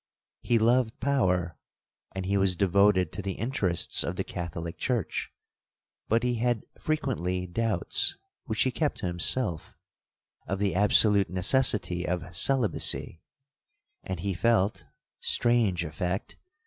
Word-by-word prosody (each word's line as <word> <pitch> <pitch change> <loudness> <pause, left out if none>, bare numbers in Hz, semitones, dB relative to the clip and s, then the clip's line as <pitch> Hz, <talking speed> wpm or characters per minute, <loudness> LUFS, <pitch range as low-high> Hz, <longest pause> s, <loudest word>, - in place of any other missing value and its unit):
He 120 - +2
loved 115 +1 +2
power, 90 - 0 0.6
and 95 -1 -3
he 100 +2 0
was 95 -2 +2
devoted 100 -1 +3
to - - -6
the 95 0 -3
interests 105 - 0
of - - -3
the - - -2
Catholic 85 -1 -6
church; 120 -5 -2 0.8
but 115 +2 +2
he 125 -1 0
had 120 -1 0
frequently 100 - -2
doubts, 110 +6 -1 0.3
(which 110 -4 +1
he 130 - 0
kept 150 +2 -1
to - - -5
himself), 85 +1 -1 0.7
of 95 - -2
the 100 0 0
absolute 100 0 +4
necessity 95 -2 +2
of 90 0 -3
celibacy, 110 -6 0 0.8
and 95 -3 -5
he 100 +1 -1
felt 105 +1 +1 0.3
(strange 115 -8 +1
effect!) 90 +5 -4
100 Hz, 125 wpm, -28 LUFS, 90-115 Hz, 0.8 s, absolute